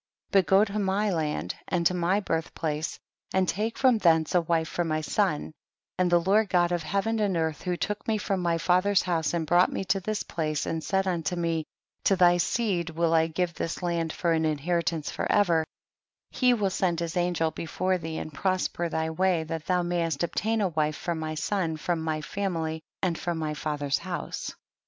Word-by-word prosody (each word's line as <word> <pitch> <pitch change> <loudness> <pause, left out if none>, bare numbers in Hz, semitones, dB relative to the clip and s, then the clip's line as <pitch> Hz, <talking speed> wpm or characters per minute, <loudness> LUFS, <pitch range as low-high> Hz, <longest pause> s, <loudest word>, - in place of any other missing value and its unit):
31. 195 - +6
But - - -13
go 195 +2 +6
to 210 0 -3
my 200 +1 +1
land 150 - -1
and 175 -2 0
to 180 - +4
my 180 +3 +1
birth 165 -4 -2
place, 155 -1 -2 0.4
and 190 -1 +3
take 215 +6 -1
from 255 -4 +4
thence 160 -3 +3
a 180 - +4
wife 165 -1 0
for 175 - -1
my 155 -1 -1
son, 160 -2 0 0.5
and 180 -1 +3
the 175 - +6
Lord 200 +4 +2
God 175 -1 +3
of 175 -1 0
Heaven 200 +7 -1
and 200 -4 +1
earth 160 -2 -1
who 180 -1 -2
took 210 +2 -3
me 220 -1 +2
from 200 -2 -1
my 170 -2 +1
father's 185 +4 +3
house 170 -2 0
and 165 -2 -1
brought 175 +4 +4
me - - -2
to 195 - +1
this 210 +2 -2
place, 155 -3 -2
and 160 -1 -3
said 195 -1 +1
unto 175 -1 -1
me, 165 -2 -1 0.4
to 195 - +5
thy 175 -1 +5
seed 180 -3 0
will 165 0 +1
I 160 0 +4
give 170 +1 -1
this 165 +3 -4
land 170 -2 0
for 170 +1 0
an 160 -1 +2
inheritance 160 +1 0
for - - -2
ever, 170 -6 +3 0.7
he 250 -1 +3
will 200 -4 0
send 175 -3 0
his 170 -1 -3
angel 175 -2 +1
before 185 +3 -1
thee 160 -1 -5
and 155 - -6
prosper 180 +2 -1
thy 160 0 -1
way, 180 0 +1
that 160 0 -5
thou 180 -1 +2
mayest 170 -3 -1
obtain 220 +6 0
a 195 - +2
wife 155 -2 0
for 170 - -3
my 155 -1 -4
son 165 0 -1
from 165 +1 -1
my 155 -1 -2
family 165 -3 -3 0.2
and 175 -3 0
from 175 -1 -2
my 155 -1 -2
father's 145 -2 -1
house. 175 0 -5
170 Hz, 205 wpm, -27 LUFS, 160-190 Hz, 0.7 s, 31